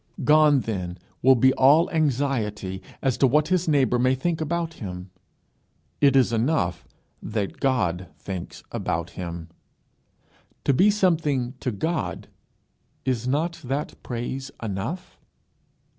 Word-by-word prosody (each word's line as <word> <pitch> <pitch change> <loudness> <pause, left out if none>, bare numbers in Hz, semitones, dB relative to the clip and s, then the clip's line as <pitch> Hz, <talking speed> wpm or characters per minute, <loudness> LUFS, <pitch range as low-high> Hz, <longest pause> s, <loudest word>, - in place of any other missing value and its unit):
Gone 150 -2 +5
then 90 -6 -4 0.2
will 130 +1 +6
be 130 +2 +4
all 150 +6 +5
anxiety 120 - -1 0.2
as 135 -3 +1
to 135 - +6
what 150 +4 +2
his 180 -2 +1
neighbour 135 -5 +3
may 130 +1 +3
think 160 +5 -1
about 165 +1 -2
him. 90 -2 -6 0.9
It 140 -2 +5
is 125 -3 +4
enough 115 - 0 0.3
that 105 -2 -3
God 95 -10 0
thinks 95 -3 -7
about - - -2
him. 85 -2 -6 1.1
To 140 - +3
be 190 +11 +5
something 160 -11 +1
to - - -2
God 160 - -3 0.8
is 125 -2 -1
not 160 +6 -1
that 135 +4 -3
praise 130 +3 -4
enough? 110 - -5
130 Hz, 125 wpm, -25 LUFS, 105-155 Hz, 1.1 s, will